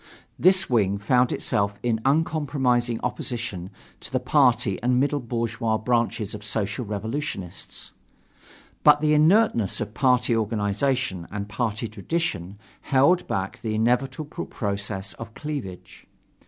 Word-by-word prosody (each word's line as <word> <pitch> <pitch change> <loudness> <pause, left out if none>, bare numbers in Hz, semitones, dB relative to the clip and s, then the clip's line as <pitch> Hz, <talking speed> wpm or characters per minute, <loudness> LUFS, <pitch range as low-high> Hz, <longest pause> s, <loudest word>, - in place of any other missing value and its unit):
This 190 +1 +5
wing 100 -5 +2
found 125 +5 +2
itself 100 0 0
in 115 -2 0
uncompromising 135 -5 +1
opposition 120 -7 -3 0.3
to - - -8
the 130 - +1
party 125 -7 +2
and 125 +1 +2
middle 145 +2 +1
bourgeois 115 -2 -1
branches 115 -2 0
of 105 -1 -8
Social 105 +3 -2
Revolutionists. 105 - -5 0.9
But 150 0 +6
the 150 0 +3
inertness 155 - +3
of 105 - -4
party 125 -1 +2
organization 110 -1 -1
and 100 0 -5
party 110 +2 -2
tradition 105 - -3 0.2
held 145 +6 +3
back 95 +2 -3
the 110 -3 -2
inevitable 130 +7 -1
process 100 -2 -3
of 115 -1 -10
cleavage. 140 - -7
120 Hz, 120 wpm, -25 LUFS, 105-135 Hz, 0.9 s, But